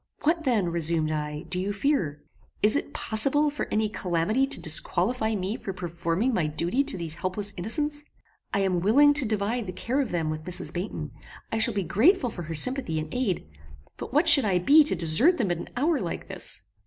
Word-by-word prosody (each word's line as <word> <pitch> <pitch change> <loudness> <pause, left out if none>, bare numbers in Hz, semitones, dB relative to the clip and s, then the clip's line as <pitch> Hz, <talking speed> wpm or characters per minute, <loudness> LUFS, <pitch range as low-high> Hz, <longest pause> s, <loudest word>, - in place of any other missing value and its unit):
"What 320 +1 +1
then," 215 -9 +1
resumed 165 -2 +1
I, 150 0 -4
"do 180 +1 -1
you 195 +2 -2
fear? 200 - -1 0.4
Is 210 +4 +4
it 290 - -2
possible 275 +8 +1
for 295 - -4
any 215 0 +1
calamity 205 +6 0
to - - -4
disqualify 220 -3 0
me 195 +2 -3
for 195 - -6
performing 175 +6 -2
my 175 -8 0
duty 170 - 0
to 280 -8 -2
these 165 -3 -4
helpless 200 +2 -2
innocents? 295 - -2 0.5
I 200 - 0
am 185 -2 +1
willing 275 +11 +5
to 290 -5 +4
divide 215 +2 -1
the 185 - -5
care 260 +9 -1
of 260 - -3
them 165 -3 -1
with 155 0 -6
Mrs. 180 -1 -3
Baynton; 175 -5 -5 0.4
I 225 - -1
shall 220 0 +1
be 200 - 0
grateful 250 - +2
for 175 - -7
her 165 0 -5
sympathy 255 - +1
and 155 0 -5
aid; 210 - -2 0.5
but - - -7
what 300 +6 +2
should 295 -4 +8
I 195 -4 +1
be 285 - +6
to 240 - -1
desert 175 - +4
them 205 - 0
at 175 - -2
an - - -7
hour 300 +4 +1
like - - -5
this!" - - -6
205 Hz, 205 wpm, -26 LUFS, 170-265 Hz, 0.5 s, should